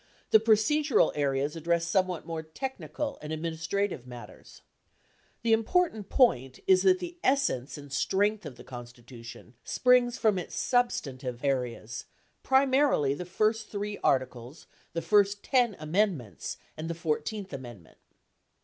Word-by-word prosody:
The 220 - +8
procedural 230 +7 +3
areas 140 0 0
address 170 +1 0
somewhat 185 -4 0
more 165 -1 -4
techni 260 - -7
cal 285 -2 -3
and 150 - -7
administrative 165 -1 -2
matters. 120 -6 -12 0.8
The 230 -1 +3
important 225 - +1
point 130 - +2
is 185 -1 +5
that 185 -1 +5
the 345 - -8
es 275 +1 +3
sence 130 - -3
and 145 -1 -10
strength 205 +8 +1
of 145 -6 -8
the - - -13
Constitution 120 -1 -11
springs 250 -1 +3
from 215 -5 +2
its 175 - -7
substantive 135 - -1
areas, 120 -5 -2 0.4
primarily 265 - +3
the 180 +5 -6
first 215 +4 0
three 205 0 -4
articles, 130 +1 -1 0.3
the 165 - -3
first 205 -1 +3
10 245 -6 +2
amendments 155 - -1 0.2
and 160 +1 -5
the 170 - -3
14th 185 +5 -3
amendment. 120 -10 -10
175 Hz, 135 wpm, -28 LUFS, 135-220 Hz, 0.8 s, The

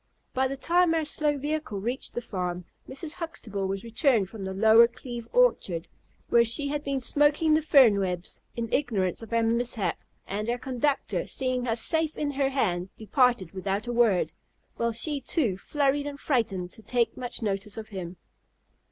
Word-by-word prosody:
By 265 +1 +2
the 275 +1 -5
time 340 +4 +3
our 320 -1 0
slow 295 -1 +2
vehicle 295 -7 -3
reached 240 +6 -4
the 240 - -3
farm, 180 -5 -4 0.2
Mrs. 290 +4 -4
Huxtable 225 - -4
was 195 0 -3
returned 230 -4 +1
from 215 -3 -7
the 190 - -4
Lower 220 +4 +6
Cleve 240 -1 -7
orchard, 200 - +2 0.4
where 235 - +6
she 260 +5 +1
had 295 0 -2
been 275 -2 -2
smoking 295 +5 +3
the 310 - +4
fernwebs, 200 - +3
in 235 -1 -2
ignorance 205 - 0
of 225 - -10
our 230 0 +2
mishap; 230 -5 -1 0.2
and 210 +3 -3
our 240 - 0
conductor, 265 +3 -1
seeing 255 -1 -1
us 225 0 +1
safe 320 +2 +1
in 290 -1 -1
her 275 -1 0
hands, 190 -9 -1
departed 225 - +2
without 195 +2 -3
a 240 - -3
word, 230 -6 +2 0.4
while 235 0 0
she 280 +5 -2
was - - -7
too 245 - +2
flurried 285 +7 0
and 285 -1 -6
frightened 215 -11 -1
to - - -4
take 230 +1 0
much 245 -1 -5
notice 200 0 -2
of 220 -1 -7
him. 185 -3 -7
235 Hz, 180 wpm, -27 LUFS, 200-280 Hz, 0.4 s, Lower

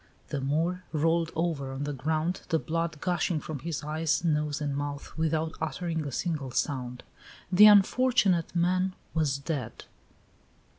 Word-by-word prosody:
The 140 - -2
Moor 165 +7 0
rolled 165 +2 +1
over 160 -5 -1
on 135 +2 -4
the 145 0 -3
ground, 155 +6 -1
the 165 - +3
blood 165 -1 -2
gushing 175 -2 0
from 150 -1 -6
his 160 +1 -4
eyes, 160 +2 0
nose, 150 -3 0
and 145 -2 -2
mouth, 145 0 -5
without 160 0 0
uttering 160 0 -2
a - - -5
single 150 -2 -2
sound. 125 -1 -2 0.5
The 205 +4 +9
unfortunate 205 -4 +4
man 185 +2 +1 0.2
was 150 -4 +1
dead. 140 -1 -5
160 Hz, 145 wpm, -28 LUFS, 145-170 Hz, 0.5 s, The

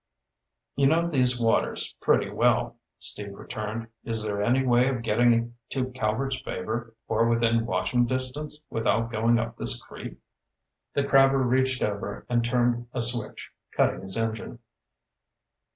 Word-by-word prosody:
"You 140 -1 +3
know 165 +4 +3
these 125 -6 +2
waters 115 -1 +1
pretty - - +3
well," - - +1 0.2
Steve 100 -1 -5
returned. 110 +2 -5 0.2
"Is 115 -2 -2
there 100 -1 -2
any 125 +5 +2
way 125 0 +4
of 125 -3 -3
getting 120 +1 +2
to 130 -1 -2
Calvert's 125 +2 -1
Favor, 115 +1 -5
or 115 - +2
within 115 0 +2
watching 120 +6 +1
distance, 130 +4 -3
without 115 0 0
going 115 +1 +2
up 115 0 -3
this - - +2
creek?" - - -10 0.8
The 140 - +2
crabber 135 -1 +5
reached 130 +1 +1
over 105 0 -3
and 120 -1 +2
turned 120 0 +1
a 125 - -1
switch, 115 -2 +1 0.3
cutting - - +2
his 95 +1 -3
engine. 115 +1 -3
120 Hz, 140 wpm, -26 LUFS, 115-130 Hz, 0.8 s, crabber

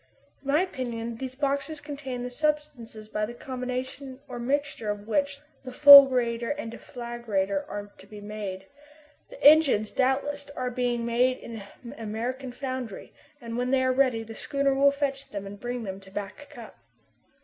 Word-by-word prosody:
In 275 - -14
my 295 +5 +3
opinion, 235 -9 -5
these 260 +1 -6
boxes 280 +2 -1
contain 280 -4 -6
the 250 - -5
substances 280 -7 -3
by 215 0 -3
the 240 - -8
combination 255 0 -5
or 245 -3 -7
mixture 275 -3 -1
of 205 0 -4
which, 280 +4 0 0.2
the 255 - -7
fulgurator 250 -4 +8
and 290 -6 -4
deflagrator 230 -5 -3
are 205 0 -6
to 195 - -15
be 210 0 -10
made. 205 -2 -6 0.6
The - - -12
engines, 285 -8 +6
doubtless, 280 +2 0
are 250 -1 -2
being 240 -1 -1
made 245 +2 +2
in 225 -2 -8 0.2
an 240 +2 -8
American 240 +4 -4
foundry, 255 -4 -6 0.3
and 235 -2 -6
when 250 0 -1
they 260 0 +3
are 255 0 +2
ready, 255 -4 +2
the 225 0 -9
schooner 275 +3 0
will 275 +1 +5
fetch 280 -1 -3
them 200 -1 -6
and 200 +1 -9
bring 245 +1 -4
them 190 -2 -6
to 195 0 -16
Back 205 +9 -7
Cup. 240 -6 -12
250 Hz, 170 wpm, -27 LUFS, 225-275 Hz, 0.6 s, fulgurator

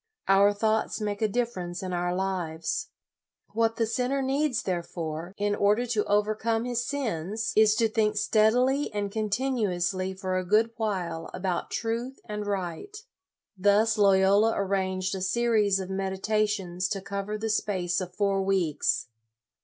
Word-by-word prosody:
Our 195 +1 +5
thoughts 220 +2 0
make 205 -1 -3
a 220 - +3
difference 195 -6 -3
in 185 -1 -4
our 175 0 -1
lives. 180 -4 -2 0.7
What 225 0 +1
the 230 -1 +1
sinner 255 +4 -1
needs, 270 -1 0
there 180 -2 -1
68 170 - -21
LOYOLA 165 - -1
fore, 165 +4 -6
in 205 0 0
order 210 +4 +2
to 225 -3 0
overcome 215 +2 +1
his 245 -1 -1
sins 220 - -2
is 215 -1 +5
to 225 +1 +3
think 215 -1 0
steadily 245 +7 +2
and 205 -1 -2
continuously 200 -5 -1
for 185 -1 -2
a - - -3
good 215 +5 +3
while 180 -7 -2
about 180 -1 -2
truth 235 +3 -3
and 210 -1 -5
right. 195 - -4 0.6
Thus 205 +3 +3
Loyola 200 +2 +5
arranged 190 -1 -1
a 190 - -4
series 210 0 +2
of 190 0 -5
meditations 190 -1 -1
to 200 0 -2
cover 200 +2 -4
the 220 +1 -2
space 185 -4 0
of 180 -1 -7
four 200 -1 +1
weeks. 190 -6 +1
205 Hz, 155 wpm, -27 LUFS, 185-225 Hz, 0.7 s, Our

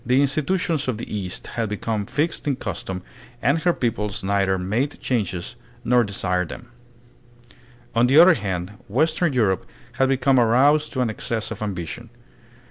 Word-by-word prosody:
The 125 +2 +3
institutions 150 +2 0
of 125 -4 -1
the 110 - -6
East 95 -3 -4
had 115 -3 -3
become 105 0 -2
fixed 155 +1 -2
in 140 - +2
custom 95 -6 -5 0.4
and 140 +6 +2
her 175 +2 +3
peoples 105 - -2
neither 95 -1 +1
made 110 +10 -1
changes 100 -8 -2 0.3
nor 125 0 +4
desired 90 -4 -1
them. 120 - -9 1.2
On 120 +1 +4
the 135 +4 +4
other 175 +3 +9
hand 95 - -3 0.2
western 155 - +1
Europe 105 -7 +1 0.3
had 135 0 +4
become 135 0 +3
aroused 140 +6 +4
to 130 - 0
an 120 -3 +1
excess 110 0 -4
of - - -6
ambition. 100 +3 -5
120 Hz, 155 wpm, -23 LUFS, 100-140 Hz, 1.2 s, other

